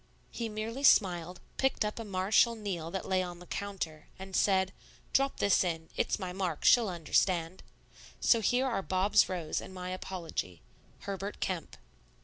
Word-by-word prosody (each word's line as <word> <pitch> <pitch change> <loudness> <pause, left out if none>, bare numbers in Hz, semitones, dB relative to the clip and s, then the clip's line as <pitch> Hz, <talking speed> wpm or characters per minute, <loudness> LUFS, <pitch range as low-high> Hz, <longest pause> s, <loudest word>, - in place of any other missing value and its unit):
He 230 -1 -3
merely 220 +5 -4
smiled, 180 -8 +4 0.2
picked 265 -4 +1
up 210 +2 -3
a - - -4
Marechal 205 +4 +3
Niel 190 -7 -4
that 190 +2 -4
lay 185 -1 +2
on 175 -1 -5
the 180 - -12
counter, 175 -6 -5
and 190 0 -7
said, 190 -1 +3 0.4
"Drop 275 0 +2
this 200 -1 +3
in. 165 -2 -3
It's - - 0
my 185 -3 -5
mark; 180 -5 -3
she'll 235 -4 +6
understand." 170 +1 0 0.6
So 230 - +4
here 245 +5 +2
are 240 -6 0
Bob's 195 +3 +3
rose 175 -4 -2
and 190 - -10
my 180 0 -5
apology. 165 - -5 0.4
HERBERT 200 +1 -5
KEMP. 180 -3 -3
190 Hz, 160 wpm, -31 LUFS, 175-210 Hz, 0.6 s, she'll